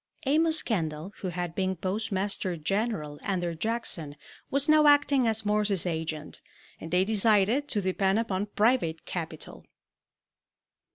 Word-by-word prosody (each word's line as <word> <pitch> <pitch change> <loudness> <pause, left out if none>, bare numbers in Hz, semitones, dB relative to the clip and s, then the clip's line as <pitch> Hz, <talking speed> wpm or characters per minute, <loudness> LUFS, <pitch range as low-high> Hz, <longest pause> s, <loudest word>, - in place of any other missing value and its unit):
Amos 320 +3 +3
Kendall, 165 -3 -3
who 190 - -5
had 175 -1 -4
been 190 +1 -1
Postmaster 190 -1 -2
General 155 -4 -2
under 175 -4 -2
Jackson, 170 -6 -2 0.3
was 280 +1 +1
now 305 -1 +5
acting 290 -3 +4
as 220 -1 +1
Morse's 210 -3 +1
agent, 160 -3 -4 0.4
and 160 - -8
they 180 +2 +2
decided 220 +5 +2
to 210 -7 0
depend 190 +1 +1
upon 205 -3 -1
private 210 -6 +1
capital. 165 -3 -7
195 Hz, 125 wpm, -28 LUFS, 170-225 Hz, 0.4 s, now